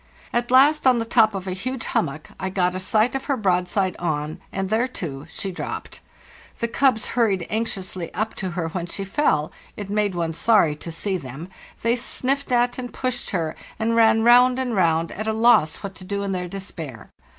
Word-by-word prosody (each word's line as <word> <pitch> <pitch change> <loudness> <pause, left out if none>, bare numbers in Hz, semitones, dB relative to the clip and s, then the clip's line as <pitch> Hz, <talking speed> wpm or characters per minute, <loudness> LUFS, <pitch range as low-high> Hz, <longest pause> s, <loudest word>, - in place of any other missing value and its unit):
At 240 0 0
last, 275 +3 +5
on 255 -2 +5
the 230 - -1
top 225 -2 +4
of 190 -1 -4
a 190 - -3
huge 245 +6 -4
hummock, 155 -1 -2
I 190 - -2
got 180 -1 +1
A} 185 - -3
sight"of 225 +7 +1
her 275 -3 0
broadside 185 -1 +1
on, 155 -1 -2
and 195 0 -3
there, 230 +3 +2
too, 160 - -6
she 195 +3 -4
dropped. 180 - -6 0.6
The 235 - -1
cubs 250 -1 +2
hurried 205 -7 +1
anxiously 190 -5 -3
up 220 +1 -1
to 190 - -2
her 165 -2 -1
when 175 +1 -4
she 195 +3 -4
fell—it 195 - -2
made 205 -2 +1
one 165 -1 -1
sorry 170 -4 +3
to 165 +3 -8
see 190 +4 -1
them—they 175 - -4
sniffed 275 +3 -1
at 245 +1 +2
and 245 -1 -5
pushed 255 -2 -3
her, 165 -5 -2 0.2
and 230 +1 0
ran 225 -1 +5
round 245 +2 +6
and 255 -3 -1
round, 165 -3 +2
at 215 +1 -5
a 220 - +1
loss 220 -9 +3
what 195 -1 -5
to 190 - -10
do 200 +2 -3
in 200 - -2
their 180 -1 -2
despair. 170 - -7
200 Hz, 195 wpm, -23 LUFS, 175-235 Hz, 0.6 s, round